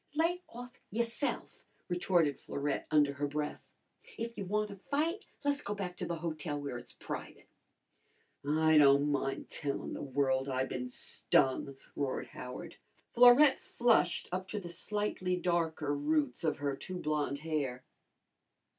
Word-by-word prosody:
"Lay 335 +3 +2
off 245 +1 -9 0.2
yourse'f!" 235 +5 -2 0.2
retorted 175 -5 +2
Florette 140 0 -3
under 145 -2 +4
her 145 +1 -2
breath. 150 +1 -4 0.5
"If 230 0 -4
you 200 - -4
wanna 210 +1 -1
fight 325 +8 0 0.2
le's 285 0 +2
go 205 - -3
back 185 -3 -4
to 180 - -3
the 170 - -2
hotel 155 -2 -3
where 140 -3 -4
it's 120 0 -8
private." - - -7 1.0
"I 155 +2 +4
don' 140 0 +6
min' 135 -1 -1
tellin' 140 -2 -3
the - - -5
world 135 -1 0
I 130 0 0
bin 125 -1 -4
stung!" 135 +2 +1 0.2
roared 140 -2 -2
Howard. 125 0 -8 0.3
Florette 250 +4 +7
flushed 235 -7 +2
up 185 +1 -3
to 210 - -3
the 175 -3 -8
slightly 185 0 -1
darker 160 -4 0
roots 145 -2 0
of 155 -2 +1
her 140 -1 -1
too 185 +6 -5
blonde 150 -3 -1
hair. 140 -6 -2
160 Hz, 145 wpm, -33 LUFS, 140-205 Hz, 1.0 s, Florette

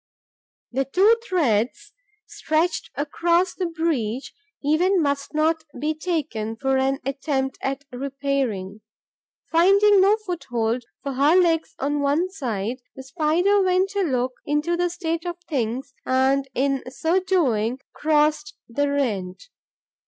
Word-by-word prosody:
The 270 +2 0
two 390 - +4
threads 305 - 0 0.3
stretched 320 +2 -1
across 340 +5 +1
the 365 - -2
breach 290 -8 -2 0.3
even 355 +6 +3
must 280 -1 -1
not 320 +1 +2 0.2
be 305 +3 0
taken 300 -10 -3
for 270 +3 0
an 270 +1 +1
attempt 270 -1 -2
at 275 +1 -3
repairing. 255 -7 -3 0.7
Finding 395 +4 +5
no 405 +3 +5
foothold 245 - -2 0.2
for 280 -1 -3
her 285 +6 +4
legs 335 -3 +2
on 290 +1 -1
one 300 +6 +1
side, 240 - -3 0.2
the 265 - -8
Spider 340 +8 +2
went 375 +1 +2
to 405 -1 -1
look 255 -7 0
into 295 +4 0
the 355 0 0
state 335 -2 -3
of 350 -1 -4
things 255 -2 -2
and, 265 +1 +2
in 270 0 +1
so 320 +7 +1
doing, 255 - +1 0.2
crossed 300 0 +1
the 285 +5 0
rent. 230 - -2
290 Hz, 130 wpm, -23 LUFS, 265-340 Hz, 0.7 s, Finding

